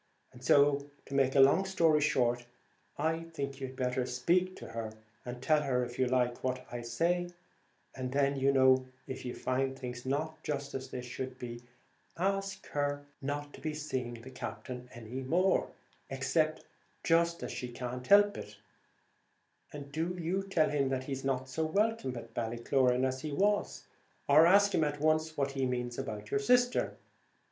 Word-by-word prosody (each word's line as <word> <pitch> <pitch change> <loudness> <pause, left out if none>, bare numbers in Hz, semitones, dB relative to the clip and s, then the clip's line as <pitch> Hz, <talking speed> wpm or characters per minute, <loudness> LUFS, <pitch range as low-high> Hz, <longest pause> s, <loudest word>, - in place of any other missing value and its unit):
And 125 0 -14
so, 140 +1 +4 0.2
to - - -9
make 135 -1 +2
a - - +5
long 135 +8 +6
story 165 -5 +3
short, 120 -4 +1 0.5
I 160 +2 0
think 140 -2 -4
you'd 130 0 -5
better 125 0 0
just 125 0 -4
speak 185 +2 +2
to - - -9
her, 115 -1 -5 0.3
and 125 0 -7
tell 155 +1 +4
her, 125 -3 +1
if 120 +1 -9
you 130 - +3
like, 125 -1 +1
what 130 0 -2
I 120 0 -4
say; 170 +10 0 0.6
and 130 -1 -4
then, 140 0 +2
you 135 0 +3
know, 130 -1 +5 0.2
if 130 - -6
you 125 - -4
find 130 +1 -1
things 125 -2 -6
not 155 +4 -2
just 140 -2 -3
as 130 0 -5
they 125 - -5
should 130 +1 -6
be, 120 -1 -7 0.6
ask 195 +1 -1
her 145 0 -1 0.2
not 145 +1 -4
to - - -12
be 155 -1 -3
seeing 130 -6 -3
the 120 +3 -11
Captain 125 -1 -7
any 120 +3 -7
more, 180 +8 +2 0.4
except 145 +4 0 0.4
just 170 +1 +2
as - - -4
she 125 - -4
can't 125 +1 -5
help; 205 0 +6 1.3
and 145 -1 -8
do 165 +4 -2
you 175 +4 0
tell 195 -5 +1
him 140 -2 +1
that 130 -1 -1
he's 135 0 -4
not 130 -1 -1
so 130 +5 -2
welcome 195 - 0
at 115 -1 -9
Ballycloran 125 +2 +1
as 130 0 -2
he 155 - -4
was, 205 +7 +1 0.4
or 155 +4 +7
ask 200 +2 +5
him 160 - +3
at 145 -1 -1
once 155 +1 +1
what 140 -1 0
he 135 -1 0
means 125 -1 -3
about 105 -5 -5
your 210 - +2
sister. 245 +3 +2
135 Hz, 175 wpm, -32 LUFS, 125-160 Hz, 1.3 s, or